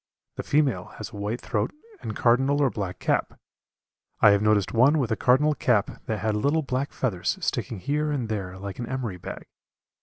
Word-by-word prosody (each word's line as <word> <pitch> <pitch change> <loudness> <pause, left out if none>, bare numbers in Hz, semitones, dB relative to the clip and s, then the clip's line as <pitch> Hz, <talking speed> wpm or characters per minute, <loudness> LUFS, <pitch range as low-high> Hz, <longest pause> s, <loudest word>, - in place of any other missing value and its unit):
The - - -2
female 135 -11 +1
has 110 +2 -7
a - - -11
white 105 +4 -3
throat - - -1 0.3
and - - -5
cardinal 135 +4 +3
or 140 -3 +3
black 95 -3 -4
cap. - - -1 0.8
I 105 - +7
have 100 0 +3
noticed 105 -3 +2
one 130 +7 +5
with 130 -7 0
a - - +3
cardinal 140 +7 +3
cap 120 -7 0
that 110 - -1
had 110 0 0
little 145 +9 +1
black 135 +1 -2
feathers 100 -9 -1
sticking 115 - -2
here 150 +10 -1
and 135 -6 -1
there 95 -4 -4
like 100 +2 -7
an 120 - -4
emery 125 -8 -3
bag. - - -8
115 Hz, 190 wpm, -26 LUFS, 105-135 Hz, 0.8 s, I